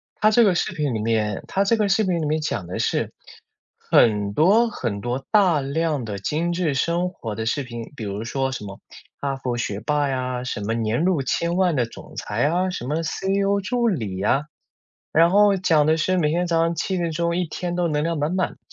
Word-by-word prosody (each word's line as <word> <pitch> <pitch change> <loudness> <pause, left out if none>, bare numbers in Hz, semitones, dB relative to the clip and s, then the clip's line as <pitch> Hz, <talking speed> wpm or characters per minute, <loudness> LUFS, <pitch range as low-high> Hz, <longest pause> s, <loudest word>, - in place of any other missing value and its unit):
它 215 0 +3
这 235 0 +5
个 185 -3 +3
视 - - 0
频 150 -8 -2
里 110 - -2
面 110 -2 0
它 195 +1 +1
这 230 - +3
个 210 -2 +1
视 210 +2 +3
频 175 -3 0
里 - - -1
面 155 +1 0
讲 125 - -3
的 90 - -5
是， - - 0 0.7
很 105 -3 +3
多 210 - +4
很 100 - -4
多 125 +3 -3
大 190 -8 +4
量 145 -1 -1
的 100 -2 -4
精 165 - -1
致 170 -5 0
生 170 +6 0
活 110 - -6
的 110 - -3
视 140 +4 0
频， 120 0 -8
比 110 - -5
如 100 +2 -4
说 135 +2 -2
什 105 - -5
么 100 -1 -8 0.4
哈 140 -1 -2
佛 125 -2 -3
学 105 -3 -3
霸 145 +3 +1
呀， 130 -1 -2
什 105 - -4
么 110 +3 -1
年 115 +6 0
入 180 -6 +2
千 170 +6 -1
万 180 -4 +2
的 120 -3 +2
总 115 - -13
裁 115 +6 -1
啊， 180 +4 +1
什 150 -9 -5
么 155 +3 -1
CEO 195 +4 0
助 235 +4 0
理 105 - -3
啊， 135 +7 +2 0.7
然 165 +2 +5
后 205 0 +5
讲 160 -5 +3
的 160 +1 +3
是， 185 +3 +1
每 150 -3 +2
天 175 +3 0
早 165 -1 +1
上 165 +1 +1
7 185 +3 -2
点 170 -1 -1
钟 170 +1 -1
一 180 - 0
天 175 +2 -4
都 175 -1 +1
能 150 -1 0
量 165 -1 -1
满 150 +5 -1
满， 185 -2 -1
155 Hz, 245 characters per minute, -23 LUFS, 120-180 Hz, 0.7 s, 这